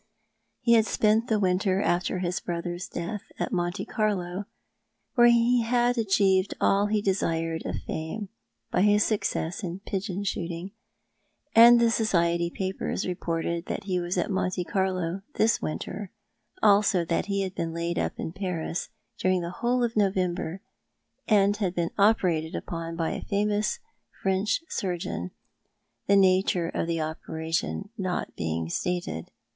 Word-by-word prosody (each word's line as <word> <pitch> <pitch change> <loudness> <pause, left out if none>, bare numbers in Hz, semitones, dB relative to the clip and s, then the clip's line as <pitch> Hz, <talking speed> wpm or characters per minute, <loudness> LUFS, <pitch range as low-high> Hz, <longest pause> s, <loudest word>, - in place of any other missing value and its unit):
He 235 -1 +4
had 225 -1 +5
spent 220 +2 +2
the 220 -3 +2
winter 185 0 +2
after 185 -1 0
his 180 -1 -1
brother's 175 +1 -4
death 185 +5 -4 0.2
at - - -2
Monte 175 +1 -1
Carlo, 200 -3 -1 0.7
where 240 -2 +6
he 235 +1 +4
had 240 +1 +2
achieved 195 -3 +2
all 200 +1 +3
he 210 0 0
desired 165 -4 0
of - - -4
fame 185 +6 -4 0.4
by - - +2
his 205 +1 +5
success 180 -5 -1
in 180 0 -5
pigeon 195 -1 -3
shooting 175 -1 -3 0.4
— - - -44
and 235 +1 +9
the 235 -1 +4
society 170 -6 +2
papers 190 +2 -3
reported 170 -1 -2
that - - -3
he 185 -2 -1
was 175 +1 -2
at 180 - 0
Monte 185 -1 0
Carlo 185 0 -1
this 225 +1 +2
winter, 190 +5 -4 0.5
also 200 -4 +4
that 165 +3 -1
he 200 -1 0
had 190 -1 -4
been 165 -3 -3
laid 170 +1 -2
up - - -1
in - - -3
Paris 180 -3 -3 0.3
during 185 -1 +2
the 170 0 -4
whole 245 +1 +2
of 235 -1 -1
November, 185 -3 0 0.7
and 205 -1 +4
had 190 -4 -1
been 170 -1 0
operated 180 -6 +3
upon 165 -1 -5
by 165 -1 -1
a - - -4
famous 210 +1 0 0.5
French 195 - +1
surgeon, 175 - -3 0.8
the 200 - +5
nature 185 -3 +3
of - - -2
the 165 -1 -1
operation 160 +4 -3
not 185 -2 -2
being 80 0 -2
stated. 175 - -3
185 Hz, 150 wpm, -27 LUFS, 170-205 Hz, 0.8 s, and